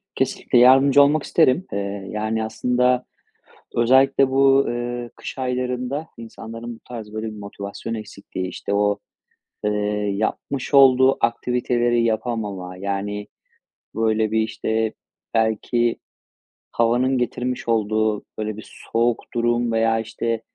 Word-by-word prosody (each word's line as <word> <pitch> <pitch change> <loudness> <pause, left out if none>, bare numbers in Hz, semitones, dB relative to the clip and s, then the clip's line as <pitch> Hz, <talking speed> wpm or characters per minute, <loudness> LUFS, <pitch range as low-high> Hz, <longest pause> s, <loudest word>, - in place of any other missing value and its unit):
Kesinlikle, - - 0
yardımcı 135 +3 +7
olmak 145 +1 +3
isterim. 165 +2 +3
Eee, 100 -1 -4
yani 110 +1 -2
aslında, 125 +3 +1 0.7
özellikle 130 +3 +4
bu, 135 0 +4
ııı, 120 0 -3
kış - - -8
aylarında 125 +3 -2
insanların 115 +1 -8
bu - - -18
tarz 110 -3 -8
böyle 110 +1 -3
bir 110 -1 -7
motivasyon 100 +2 -7
eksikliği, 100 -3 -6
işte 95 +2 -5
o, 105 0 +2 0.7
eee, 105 - +2 0.5
yapmış 130 +6 -3
olduğu 130 -1 +6
aktiviteleri 120 0 +1
yapamama, 105 -5 -2
yani, 100 +1 -3 0.7
böyle, 110 -1 +1
bir, 110 - +1
işte, 110 0 -1 0.4
belki 115 +1 +1 0.8
havanın 125 +3 +2
getirmiş 125 0 -2
olduğu, 110 -1 +1
böyle, 110 -1 -3
bir 110 - -11 0.2
soğuk 115 0 +2
durum 120 0 +1
veya, 115 0 +2
işte, 115 0 -3
115 Hz, 115 wpm, -22 LUFS, 110-125 Hz, 0.8 s, yardımcı